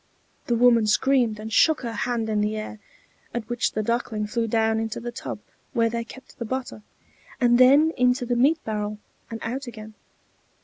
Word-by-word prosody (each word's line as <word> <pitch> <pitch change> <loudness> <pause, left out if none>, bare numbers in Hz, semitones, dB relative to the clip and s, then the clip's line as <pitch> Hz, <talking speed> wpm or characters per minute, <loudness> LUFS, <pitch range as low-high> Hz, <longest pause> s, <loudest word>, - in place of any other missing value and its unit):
The 240 - +2
woman 235 -2 +4
screamed 240 -1 +2
and 220 +1 -6
shook 315 +7 +4
her 235 -2 -4
hand 230 +1 -2
in 215 -1 0
the 210 +1 -1
air, 215 0 -6 0.6
at 230 -2 -3
which 240 0 -1
the 215 - -1
Duckling 230 -1 -1
flew 230 +2 -2
down 220 0 +1
into 225 -1 -3
the 240 +1 -5
tub 240 - -6 0.4
where 230 -3 +2
they 235 0 -2
kept 260 +3 -14
the - - -2
butter, 255 -1 -5 0.6
and 240 -1 +4
then 280 +5 +6
into 250 0 +2
the 245 0 0
meal 275 +7 +4
barrel 210 -1 -3 0.3
and 230 - -5
out 260 +4 -4
again. 215 -2 -9
235 Hz, 185 wpm, -24 LUFS, 220-250 Hz, 0.6 s, then